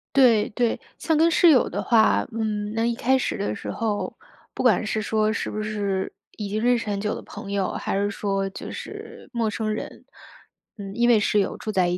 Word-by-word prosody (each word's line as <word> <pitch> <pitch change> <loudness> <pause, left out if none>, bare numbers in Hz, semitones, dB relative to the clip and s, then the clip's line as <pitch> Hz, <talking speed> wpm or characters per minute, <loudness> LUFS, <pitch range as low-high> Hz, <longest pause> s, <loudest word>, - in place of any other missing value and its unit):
对 235 -6 +5
对。 235 +1 0 0.2
像 320 -2 +1
跟 325 +2 +5
室 335 +1 +5
友 265 -5 +5
的 - - -3
话， 220 -2 +4
嗯， 215 -2 -2
那 225 +1 0
一 235 0 +1
开 260 +3 +2
始 255 - -2
的 200 - -1
时 - - -6
候， 215 -2 -2 0.4
不 - - -3
管 230 -4 +4
是 215 0 -1
说 215 0 +1
是 - - -3
不 215 - -3
是 205 -3 -2 0.3
已 210 - -4
经 215 +2 -2
认 245 0 +4
识 230 - -5
很 200 -1 -1
久 210 +1 -1
的 - - -6
朋 205 -1 -8
友， 200 -2 0
还 - - -2
是 205 +1 +1
说 195 -1 -1
就 - - -7
是 - - -9
陌 230 -2 0
生 215 0 -2
人， 215 - -7 0.7
嗯， 195 -1 -7
因 240 +1 +3
为 230 - +6
室 210 0 +2
友 195 - -3
住 - - -6
在 185 -4 +2
一 175 - 0
215 Hz, 240 characters per minute, -24 LUFS, 205-235 Hz, 0.7 s, 为